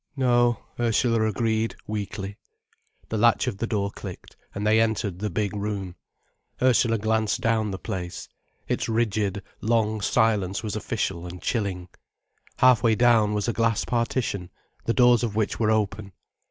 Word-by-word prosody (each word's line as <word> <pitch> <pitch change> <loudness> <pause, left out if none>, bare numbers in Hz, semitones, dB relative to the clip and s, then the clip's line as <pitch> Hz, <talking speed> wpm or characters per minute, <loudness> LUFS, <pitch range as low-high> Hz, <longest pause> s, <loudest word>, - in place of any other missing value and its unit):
"No," 120 -3 +2 0.2
Ursula 115 -1 +2
agreed, 110 +1 0
weakly. 100 -1 -5 0.7
The 110 - -1
latch 120 +1 +4
of 115 -7 -3
the 115 - -1
door 100 -3 -1
clicked, - - -9 0.2
and 100 +1 -3
they 110 +1 +4
entered 105 -5 -1
the 105 +1 -2
big 105 +2 -2
room. 100 -3 -4 0.6
Ursula 120 -2 +3
glanced 110 0 0
down 110 -2 +1
the 95 - -4
place. 90 -1 -5 0.4
Its - - -1
rigid, 105 -3 0 0.2
long 110 -1 +1
silence 100 -2 +1
was 110 -1 -3
official 90 -4 -3
and 90 +1 -8
chilling. 95 -6 -2 0.7
Half 130 -2 +5
way 115 -2 +3
down 115 -3 +4
was 105 +1 -1
a 120 - 0
glass 115 -1 +1
partition, 115 -6 -1 0.4
the 115 - +1
doors 125 -2 +5
of 115 -4 -2
which 110 -1 -1
were 110 -2 +2
open. 105 -2 -1
110 Hz, 155 wpm, -25 LUFS, 100-115 Hz, 0.7 s, Half